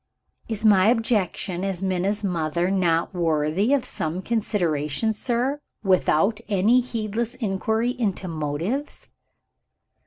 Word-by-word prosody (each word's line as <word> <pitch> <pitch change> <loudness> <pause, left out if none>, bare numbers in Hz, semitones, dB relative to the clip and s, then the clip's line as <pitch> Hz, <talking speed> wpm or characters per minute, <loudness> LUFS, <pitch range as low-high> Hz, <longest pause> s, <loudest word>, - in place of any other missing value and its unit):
"Is 220 -1 -3
my 200 -2 +6
objection, 210 -6 0
as 195 -1 -2
Minna's 190 +3 0
mother, 175 -1 0
not 175 -2 +1
worthy 165 - +1
of 280 -3 +2
some 165 +4 -3
consideration, 185 -4 0
sir, 250 +6 -1 0.2
without 195 +2 +2
any 215 +5 +4
needless 225 +2 -2
inquiry 220 +1 0
into 195 -4 -1
motives?" 165 - -3
195 Hz, 105 wpm, -24 LUFS, 175-225 Hz, 0.2 s, my